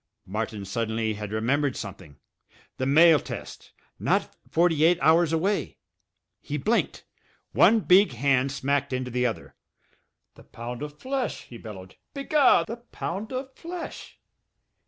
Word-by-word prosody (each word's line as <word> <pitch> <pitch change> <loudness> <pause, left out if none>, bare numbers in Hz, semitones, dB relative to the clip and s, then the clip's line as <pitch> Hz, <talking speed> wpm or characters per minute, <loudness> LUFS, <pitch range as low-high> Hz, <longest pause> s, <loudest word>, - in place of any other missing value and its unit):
Martin 105 0 -4
suddenly 110 +2 -1
had 105 -1 -6
remembered 130 +5 0
something. 95 -8 -9 0.6
The 130 - -1
mail 160 +2 +6
test! - - -8 0.3
Not - - 0
forty 165 -2 +2
eight 170 +2 +5
hours 165 +1 +4
away! 185 +6 -1 0.6
He - - -4
blinked. - - 0 0.5
One 225 0 +5
big 185 -4 +5
hand 135 +2 +2
smacked 140 0 -1
into 130 0 -3
the 125 +1 +1
other. 115 - -6 0.8
"The - - -17
pound 120 +2 -8
of 150 0 -7
flesh!" 260 - -3
he 120 - -12
bellowed. 95 -4 -10 0.2
"Be 275 - -4
gar! 290 -1 +4
The 230 +2 -6
pound 215 -3 -6
of 260 +1 -5
flesh!" 340 0 -8
140 Hz, 135 wpm, -26 LUFS, 115-180 Hz, 0.8 s, mail